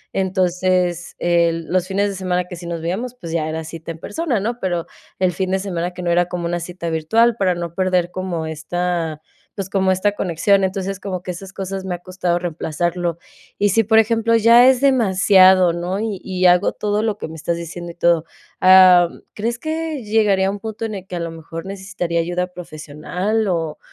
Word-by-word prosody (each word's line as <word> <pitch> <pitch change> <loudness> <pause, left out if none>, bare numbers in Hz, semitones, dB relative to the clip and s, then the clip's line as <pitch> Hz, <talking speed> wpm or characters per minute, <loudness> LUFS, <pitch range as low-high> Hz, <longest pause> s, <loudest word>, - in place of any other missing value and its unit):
Entonces, 180 -2 0
eh, 170 -1 +2
los 185 +2 0
fines 200 +1 0
de - - -4
semana 180 -1 -1
que 180 - -8
sí 170 0 -9
nos 170 -1 -4
veíamos, 225 +9 -3
pues 170 -10 -8
ya, 155 -2 -1
era 160 +1 -4
cita 160 +1 -9
en 165 - -8
persona, 280 - -2
¿no?, 235 +4 -3
pero 175 -4 -2 0.3
el 185 -1 +1
fin 185 +2 -2
de 190 - +1
semana 180 -3 -3
que 180 - -6
no, 175 - 0
era 175 0 +3
como 175 -1 -3
cita 170 -1 -5
virtual 225 +9 +2
para 190 -5 +1
no 170 -1 -5
perder 180 -1 0
como 180 -3 -3
esta, 160 0 -3 0.3
pues, 195 -1 -5
como 190 -1 +2
esta 185 +2 +1
conexión. 195 +1 +1
Entonces, 190 0 -2
como 185 -3 -5
que 180 - -4
esas 190 +2 -9
cosas 195 0 -5
me 185 -2 -3
ha - - -7
costado 180 -1 -2
reemplazarlo. 175 0 -2 0.4
Y 205 - +2
si, 225 +4 +3
por 220 +2 +3
ejemplo, 225 +1 +3
ya 230 +2 +7
es 260 -1 +2
demasiado, 190 -8 +5
¿no?, 175 +3 -3
y 215 -3 -3
y 185 -1 -1
hago 180 0 +4
todo 210 0 -1
lo 215 -2 -1
que - - -5
me 160 - -10
estás 170 +2 -2
diciendo 170 +1 -7
y - - -16
todo, 170 -2 +2 0.3
am, 185 -2 +6
¿crees 230 +3 -2
que 315 -1 -4
llegaría 205 -3 +2
un 205 - -6
punto 220 +1 -5
en 220 - -4
el 195 -2 -7
que 180 - -6
a - - -3
lo 170 -1 -4
mejor 165 +1 -8
necesitaría 190 -3 -3
ayuda 175 +2 -1
profesional 180 +6 -3
o 165 -4 -2
185 Hz, 205 wpm, -20 LUFS, 170-200 Hz, 0.4 s, ya